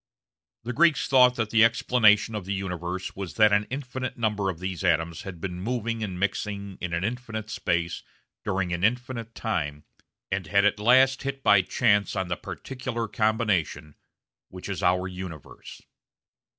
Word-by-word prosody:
The 120 Hz, +2 st, -4 dB
Greeks 165 Hz, +3 st, +3 dB
thought 125 Hz, -2 st, +5 dB
that 110 Hz, -3 st, -2 dB
the 115 Hz, -1 st, +5 dB
explanation 115 Hz, -2 st, +4 dB
of 105 Hz, -4 st, -4 dB
the 100 Hz, +1 st, -2 dB
universe 90 Hz, -1 st, -4 dB
was 95 Hz, -2 st, -6 dB
that 110 Hz, -2 st, +5 dB
an 105 Hz, +1 st, +2 dB
infinite 130 Hz, -1 st, -5 dB
number 105 Hz, -4 st, 0 dB
of 90 Hz, -, -4 dB
these 90 Hz, 0 st, -5 dB
atoms 80 Hz, +1 st, +1 dB
had 95 Hz, -3 st, -8 dB
been 90 Hz, 0 st, -5 dB
moving 115 Hz, 0 st, -2 dB
and 95 Hz, -4 st, -4 dB
mixing 100 Hz, 0 st, -3 dB
in 90 Hz, -, -3 dB
an 85 Hz, +1 st, -1 dB
infinite 110 Hz, -1 st, -4 dB
space 85 Hz, -1 st, -1 dB, 0.4 s
during 90 Hz, -2 st, -1 dB
an 85 Hz, +1 st, -3 dB
infinite 115 Hz, 0 st, -1 dB
time, 75 Hz, -9 st, -3 dB, 0.5 s
and 95 Hz, -3 st, -2 dB
had 100 Hz, +3 st, +3 dB
at 105 Hz, 0 st, +2 dB
last 130 Hz, +4 st, +4 dB
hit 135 Hz, -1 st, -4 dB
by 100 Hz, -2 st, +6 dB
chance 100 Hz, +2 st, +1 dB
on 95 Hz, -2 st, -2 dB
the 85 Hz, -, 0 dB
particular 125 Hz, -, -5 dB
combination 100 Hz, -10 st, 0 dB, 0.6 s
which 90 Hz, +1 st, -9 dB
is 100 Hz, -, -3 dB
our 90 Hz, +1 st, +2 dB
universe. 90 Hz, -5 st, -9 dB
105 Hz, 165 wpm, -26 LUFS, 90-115 Hz, 0.6 s, by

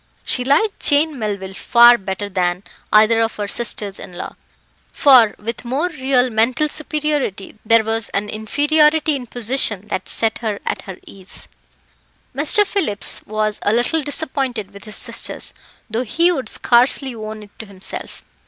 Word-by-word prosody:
She 250 Hz, -, -1 dB
liked 290 Hz, -, +1 dB
Jane 295 Hz, -1 st, +2 dB
Melville 200 Hz, -3 st, -4 dB
far 240 Hz, +4 st, +6 dB
better 195 Hz, -1 st, -5 dB
than 180 Hz, -1 st, -1 dB, 0.3 s
either 220 Hz, +2 st, +5 dB
of 225 Hz, -1 st, -1 dB
her 205 Hz, -1 st, -4 dB
sisters 205 Hz, -3 st, -3 dB
in 180 Hz, -, -10 dB
law, 175 Hz, -, -7 dB, 0.6 s
for, 255 Hz, -7 st, +5 dB
with 225 Hz, +2 st, -6 dB
more 270 Hz, +9 st, -1 dB
real 260 Hz, -5 st, +1 dB
mental 240 Hz, +7 st, +1 dB
superiority, 295 Hz, -, -3 dB
there 225 Hz, 0 st, +4 dB
was 225 Hz, 0 st, -2 dB
an 200 Hz, +1 st, -2 dB
inferiority 300 Hz, +8 st, +2 dB
in 250 Hz, -3 st, -6 dB
position 225 Hz, -4 st, -1 dB
that 185 Hz, -, -4 dB
set 225 Hz, -1 st, +1 dB
her 215 Hz, -3 st, -3 dB
at -, -, -3 dB
her 185 Hz, -, -7 dB
ease. 195 Hz, 0 st, -11 dB, 0.9 s
Mr. 420 Hz, -1 st, +4 dB
Phillips 315 Hz, -, 0 dB
was 215 Hz, 0 st, -2 dB
a 205 Hz, -, +1 dB
little 245 Hz, +8 st, +1 dB
disappointed 265 Hz, -8 st, -3 dB
with 200 Hz, -1 st, -13 dB
his 215 Hz, -, -4 dB
sisters, -, -, -1 dB, 0.3 s
though 225 Hz, +2 st, -2 dB
he 335 Hz, +10 st, +2 dB
would 265 Hz, -10 st, -3 dB
scarcely 255 Hz, +2 st, +2 dB
own 215 Hz, -1 st, -7 dB
it 205 Hz, -, -16 dB
to 220 Hz, -, -8 dB
himself. 195 Hz, -1 st, -6 dB
230 Hz, 155 wpm, -19 LUFS, 210-275 Hz, 0.9 s, far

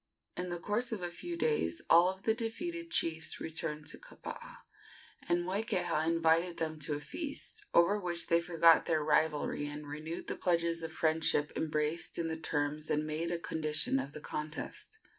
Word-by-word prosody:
In 180 Hz, 0 st, -3 dB
the 175 Hz, -, -2 dB
course 225 Hz, +7 st, 0 dB
of 210 Hz, -5 st, -3 dB
a 175 Hz, -, -2 dB
few 175 Hz, 0 st, -5 dB
days 150 Hz, -, +1 dB
all 170 Hz, +2 st, +7 dB
of 190 Hz, +1 st, -6 dB
the 220 Hz, -, +3 dB
defeated 335 Hz, +10 st, -4 dB
chiefs 160 Hz, -, 0 dB
returned 155 Hz, -1 st, -3 dB
to -, -, -5 dB
Kapaa, -, -, -9 dB, 0.7 s
and 175 Hz, 0 st, +3 dB
Moikeha 180 Hz, -5 st, 0 dB
invited 165 Hz, +1 st, +3 dB
them 155 Hz, -1 st, -2 dB
to 150 Hz, 0 st, -1 dB
a -, -, -3 dB
feast, 315 Hz, -, -4 dB
over 195 Hz, +5 st, +5 dB
which 175 Hz, -3 st, -1 dB
they 170 Hz, -1 st, +3 dB
forgot 165 Hz, -1 st, +5 dB
their 160 Hz, -2 st, +2 dB
rivalry 150 Hz, -1 st, +2 dB
and 150 Hz, +1 st, -6 dB
renewed 155 Hz, +3 st, -5 dB
the -, -, -3 dB
pledges 170 Hz, -1 st, +1 dB
of 160 Hz, -1 st, -4 dB
friendship 160 Hz, -2 st, +1 dB
embraced 155 Hz, +1 st, -1 dB
in 165 Hz, -1 st, -1 dB
the 160 Hz, -, -1 dB
terms 150 Hz, -1 st, -2 dB
and 150 Hz, 0 st, +1 dB
made 155 Hz, +2 st, -2 dB
a 175 Hz, -, 0 dB
condition 155 Hz, -4 st, 0 dB
of 135 Hz, +2 st, -5 dB
the 150 Hz, -, -5 dB
contest. 155 Hz, -, -5 dB
165 Hz, 180 wpm, -33 LUFS, 155-180 Hz, 0.7 s, all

